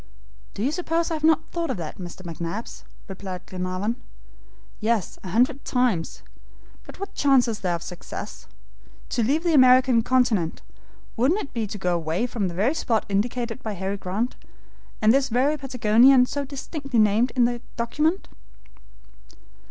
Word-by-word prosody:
"Do 200 - -3
you 270 - +1
suppose 335 0 -1
that - - -2
I - - -1
have 305 - -11
not 320 0 +4
thought 340 -1 -2
of - - -2
that, 165 0 -6
Mr. 180 +1 -8
McNabbs?" 170 +5 -6 0.3
replied 190 -1 -7
Glenarvan. 185 +5 -3 0.8
"Yes, 220 -4 -1
a - - -7
hundred 255 - +2
times. 245 -10 0 0.6
But - - -13
what 395 - -6
chance 270 -3 +4
is 220 -2 -3
there 180 -2 0
of 170 - -6
success? 180 -1 -8 0.6
To 240 - 0
leave 285 +9 +1
the 340 -2 +2
American 255 -3 +6
continent, 225 -9 +1 0.5
wouldn't 295 - +2
it - - -9
be 225 -3 -2
to 210 - -6
go 180 -2 0
away 165 +5 -1
from 230 -5 -2
the 170 - -6
very 215 - +2
spot 230 -8 0
indicated 235 +4 -1
by 220 -5 -4
Harry 195 +1 -3
Grant, 200 +6 -2 0.6
from 215 0 +5
this 270 +1 +2
very 260 +6 +2
Patagonia 250 -1 +4
so 280 +2 -3
distinctly 275 -1 -5
named 215 +3 +3
in 245 -2 +4
the 240 0 -2 0.2
document." 300 +10 0
235 Hz, 165 wpm, -24 LUFS, 195-270 Hz, 0.8 s, American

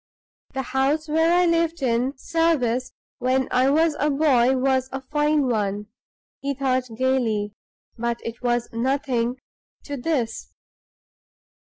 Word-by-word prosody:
"The 265 - -1
house 270 +5 0
where 320 +2 +2
I 355 +1 +4
lived 335 -2 +1
in 250 +3 0
service 265 -7 0 0.3
when 255 +1 +1
I 255 +2 +3
was 315 +2 +3
a 295 - +2
boy, 265 -3 +3
was 260 0 +1
a 270 - -3
fine 295 +2 +1
one," 210 -3 -1 0.5
he 280 0 -2
thought, 255 -1 0
gayly; 225 -6 0 0.5
"but 235 0 -1
it 230 +1 -6
was 240 -1 0
nothing 250 0 0 0.5
to 285 -1 -5
this! 245 -5 -2
265 Hz, 130 wpm, -23 LUFS, 240-295 Hz, 0.5 s, I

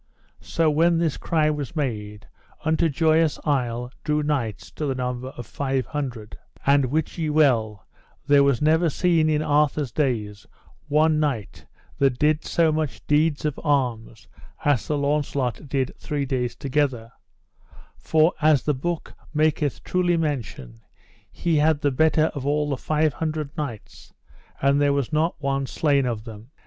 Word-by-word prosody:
So 165 -2 0
when 165 +3 +3
this 165 -3 0
cry 155 -3 +1
was 150 +2 -5
made, 105 -8 -4 0.4
unto 160 +1 +2
Joyous 160 +1 +2
Isle 125 -4 -1
drew 150 0 0
knights 130 -9 -2
to 150 - -4
the 135 - -1
number 125 0 -3
of 120 -2 -8
five 135 +2 -2
hundred; 125 -8 -5 0.3
and 140 0 +4
wit 155 +5 -2
ye 160 -2 -1
well 115 -10 +2 0.4
there 145 -1 +5
was 140 0 +2
never 160 +2 +3
seen 165 0 +2
in 155 0 +1
Arthur's 150 -3 +1
days 110 -8 -2 0.4
one 155 +1 +3
knight 135 -9 -3 0.3
that 135 -3 +2
did 150 +2 +2
so 165 -2 +2
much 155 -2 -3
deeds 150 0 +1
of 150 -3 -2
arms 120 -7 -1 0.4
as 145 -6 +3
Sir 150 - -2
Launcelot 140 -2 -1
did 135 -1 -1
three 145 -2 -2
days 125 -3 -2
together; 135 -5 -1 0.8
for 160 +2 +2
as 150 -5 +4
the 150 - +1
book 165 +5 -4 0.2
maketh 150 -2 +1
truly 175 -1 +1
mention, 120 - -4 0.5
he 170 -3 0
had 150 0 +2
the 145 - +2
better 155 +3 +2
of 140 - -5
all 150 +1 0
the - - +1
five 155 +2 0
hundred 155 +1 -4
knights, 140 -10 -7 0.5
and 140 +1 +2
there 145 -1 +3
was 140 +1 -2
not 160 +2 0
one 135 -1 -1
slain 140 -3 +1
of 115 -3 -3
them. 110 0 -11
145 Hz, 155 wpm, -24 LUFS, 130-155 Hz, 0.8 s, there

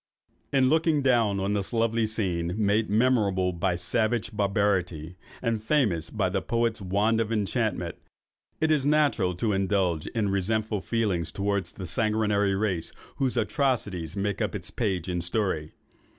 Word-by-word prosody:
In 135 -2 +4
looking 155 0 +2
down 115 -6 +3
on 100 +2 0
this 100 -2 -2
lovely 115 -1 +1
scene, 90 -6 -2
made 105 +1 +1
memorable 105 -5 +2
by 85 +1 0
savage 110 +5 0
barbarity, 95 -5 0 0.3
and 115 -3 0
famous 110 - +1
by 105 -4 0
the 95 +1 -1
poet's 115 +1 0
wand 105 +4 +1
of 115 0 -2
enchantment, 105 -4 -1 0.6
it 160 0 +2
is 150 -3 +3
natural 140 -11 +2
to 105 +4 0
indulge 95 -4 0
in 110 -4 -1
resentful 105 +2 0
feelings 100 -9 -1
towards 100 -1 -2
the 95 - -7
sanguinary 105 +1 +1
race 95 -5 -1 0.3
whose 130 -2 0
atrocities 105 - -1
make 100 0 -2
up - - -1
its - - -5
page 95 -7 -1
in 90 -1 -1
story. 90 -4 -1
105 Hz, 150 wpm, -27 LUFS, 95-115 Hz, 0.6 s, In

